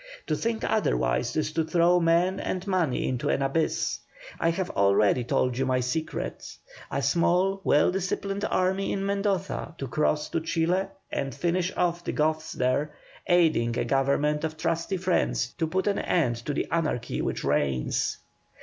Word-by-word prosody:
To - - 0
think 230 -1 -2
otherwise - - 0
is 155 0 0
to 160 +1 0
throw 170 +2 +3
men 175 +3 +2
and 185 0 -3
money 180 -9 0
into 125 -2 -1
an 135 - +1
abyss. 145 +4 0 0.4
I 165 - +2
have 180 +2 -2
already 100 +4 +3
told 125 +1 0
you 135 - +1
my 130 -1 +2
secret. 130 +6 -4 0.3
A 140 - -2
small, 180 +6 +2
well 150 +1 +4
disciplined 195 +2 -2
army 190 +1 0
in 195 0 -2
Mendoza, 195 -3 -1
to 135 - -4
cross 150 +3 0
to 165 - -1
Chile 165 +4 0 0.2
and 135 -2 -3
finish 180 +1 0
off 175 -1 0
the - - -3
Goths 155 0 0
there, 140 +4 0 0.3
aiding 155 -10 +3
a - - 0
government 145 +3 +1
of 155 0 -3
trusty 165 +4 -1
friends 175 -8 0
to 160 - +1
put 185 +4 -1
an 205 -1 +1
end 125 -10 +1
to 145 - 0
the - - -1
anarchy 155 -8 -1
which - - -2
reigns. 65 -3 0
165 Hz, 165 wpm, -27 LUFS, 135-185 Hz, 0.4 s, well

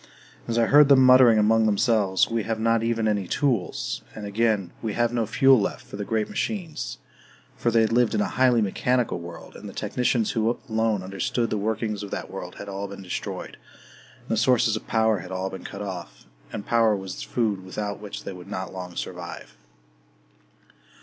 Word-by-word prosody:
And 115 - -1
I 115 - +4
heard 145 +4 +6
them 130 -2 +7
muttering 125 -3 +7
among 110 +1 +4
themselves, 105 -2 +2
"We 115 0 -1
have 110 +1 -3
not 115 0 +2
even 115 -1 0
any 100 -3 0
tools!", 120 -8 -1
and 105 - -6
again, 105 -3 0
"We 110 -2 -2
have 120 +1 +1
no 115 -3 0
fuel 135 -1 +5
left - - -3
for - - -10
the 105 - -4
great 110 0 -1
machines!"... 175 -8 -4 0.6
For 120 - 0
they 115 0 +4
had 110 - +2
lived 120 -1 +3
in 210 - +2
a - - +2
highly 125 -3 +4
mechanical 125 +3 0
world, 85 0 -10
and - - -9
the - - -11
technicians 120 -3 0
who 115 +1 0
alone 110 -3 0
understood 115 +5 -2
the 105 - 0
workings 110 0 -2
of 100 - -6
that - - -5
world - - -7
had 100 - -8
all 100 0 -4
been 100 0 -9
destroyed, 90 - -5 0.6
and - - -23
the 110 - +1
sources 115 -1 +3
of 110 - -6
power 110 -2 +2
had 90 +1 -9
all 95 +1 -3
been 95 - -8
cut 100 - -6
off 90 -11 -7 0.3
and 105 - -6
power 115 -2 +3
was 95 -2 -6
the - - -7
food 105 -6 0
without 100 +2 -4
which 105 -1 -7
they - - -6
could 90 -1 -11
not 95 0 -5
long 90 -2 -7
survive. - - -7
110 Hz, 200 wpm, -25 LUFS, 100-115 Hz, 0.6 s, them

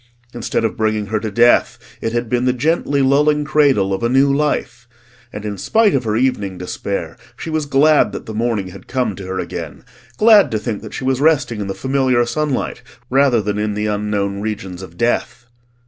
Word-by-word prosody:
Instead 115 -1 -2
of 110 - -2
bringing 110 -1 0
her 110 +2 -2
to 110 - -4
death, 120 +4 +3 0.2
it 115 - -2
had 120 0 -2
been 125 +2 0
the 125 - +2
gently 140 +1 0
lulling 150 +2 +3
cradle 140 -10 +2
of 95 - -3
a 115 - +1
new 135 +2 +3
life. 120 -5 -2 0.4
And 105 0 -7
in 105 -2 -4
spite 220 -3 +3
of 130 -3 0
her 110 -1 0
evening 105 -6 0
despair 100 +5 -4 0.2
she 160 - -6
was 155 -2 -1
glad 145 +2 +4
that - - -7
the 110 - -7
morning 110 -4 -1
had 95 +2 -13
come 125 -6 -1
to 95 -2 -8
her 95 0 -4
again: - - -6 0.3
glad 215 0 +6
to 110 - -1
think 110 0 -4
that - - -9
she - - -5
was 130 0 0
resting 145 -8 +2
in 100 - -4
the 95 - -4
familiar 130 0 +1
sunlight 145 0 -2 0.3
rather 130 -4 +3
than 105 0 -2
in 105 -1 -1
the 105 0 -2
unknown 105 -1 -2
regions 100 -4 -5
of 85 -2 -11
death. 120 0 -1
120 Hz, 205 wpm, -18 LUFS, 105-135 Hz, 0.4 s, glad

